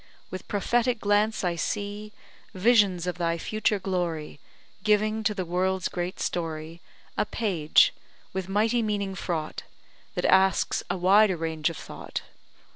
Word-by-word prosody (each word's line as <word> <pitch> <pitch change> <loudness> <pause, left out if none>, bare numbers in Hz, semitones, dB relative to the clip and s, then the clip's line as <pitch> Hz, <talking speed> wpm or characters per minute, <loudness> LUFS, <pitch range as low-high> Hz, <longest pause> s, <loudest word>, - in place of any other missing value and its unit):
With 185 0 -7
prophetic 240 +4 +1
glance, 205 +1 +2
I 175 -2 0
see 205 +4 -3 0.4
Visions 195 -4 +4
of 180 0 -3
thy 170 -1 0
future 215 +3 0
glory, 175 -6 -3 0.4
Giving 215 +1 +2
to 210 - +2
the 185 -2 -2
world's 185 +2 0
great 175 +1 -4
story 165 -1 -3 0.4
A - - +4
page, 175 -9 +3 0.4
with 190 0 -3
mighty 220 +4 +2
meaning 205 -3 -1
fraught, 165 -5 -3 0.5
That - - -1
asks 190 -1 +3
a 180 - -1
wider 190 +1 +5
range 160 0 -1
of 165 - -7
thought. - - -7
190 Hz, 135 wpm, -27 LUFS, 175-210 Hz, 0.5 s, wider